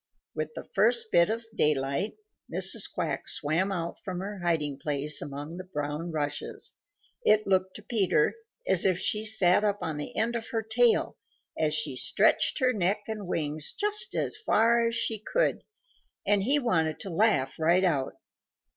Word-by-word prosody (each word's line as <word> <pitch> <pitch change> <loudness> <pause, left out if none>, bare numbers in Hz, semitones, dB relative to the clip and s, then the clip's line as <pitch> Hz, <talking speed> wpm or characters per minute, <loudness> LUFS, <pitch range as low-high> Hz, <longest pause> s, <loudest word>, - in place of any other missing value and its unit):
With 155 0 -4
the - - -6
first 225 +2 +1
bit 170 +3 +4
of 225 +1 -1
daylight, 140 +4 +1 0.4
Mrs. - - +4
Quack - - -3
swam 165 +7 0
out 170 -3 -4
from 185 -4 -4
her 200 +1 -6
hiding 155 -5 -1
place 145 +1 +1
among 145 +4 -7
the 185 - -6
brown 150 -1 -4
rushes. 145 -2 -3 0.5
It 215 - +4
looked 190 -1 +1
to 210 - -9
Peter 200 -9 +2 0.3
as - - +2
if 185 -3 +2
she 210 +4 -1
sat 205 -3 +4
up 205 -1 +1
on 155 -2 -3
the 150 - -6
end 235 +2 0
of 230 -1 -4
her 225 -1 -2
tail 230 +2 +2 0.4
as 155 -1 +1
she 150 -3 -1
stretched - - +2
her 255 -3 +2
neck 200 0 0
and 215 -4 -5
wings 155 -2 -2
just 420 +3 -1
as - - -1
far 235 - +3
as 230 - -2
she 230 -1 -2
could, - - 0 0.6
and 205 -1 +3
he 270 +9 +3
wanted 165 - 0
to 195 - -5
laugh 170 -9 +1
right 170 +4 +3
out. 145 -8 0
185 Hz, 170 wpm, -28 LUFS, 155-220 Hz, 0.6 s, bit